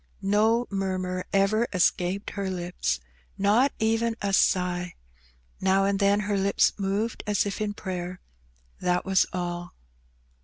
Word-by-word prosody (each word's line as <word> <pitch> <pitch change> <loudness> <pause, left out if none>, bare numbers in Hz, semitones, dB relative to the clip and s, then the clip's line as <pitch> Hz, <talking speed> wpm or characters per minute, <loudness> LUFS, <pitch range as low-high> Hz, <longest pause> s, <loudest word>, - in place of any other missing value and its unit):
No 220 +4 +3
murmur 185 -2 -2
ever 210 +4 +2
escaped 185 +1 +1
her 200 -1 -3
lips, 180 - -2 0.4
not 215 +8 +3
even 225 +1 +1
a 200 -1 -2
sigh; 180 -2 +1 0.6
now 190 +1 +3
and 200 0 +1
then 200 +1 +3
her 205 0 -1
lips 200 +1 +3
moved 200 +4 -1
as 210 -1 +2
if 200 +1 -4
in 205 -1 -2
prayer, 180 -2 -5 0.6
that 180 0 0
was 190 -1 +3
all. 175 -1 -4
195 Hz, 130 wpm, -26 LUFS, 185-205 Hz, 0.6 s, No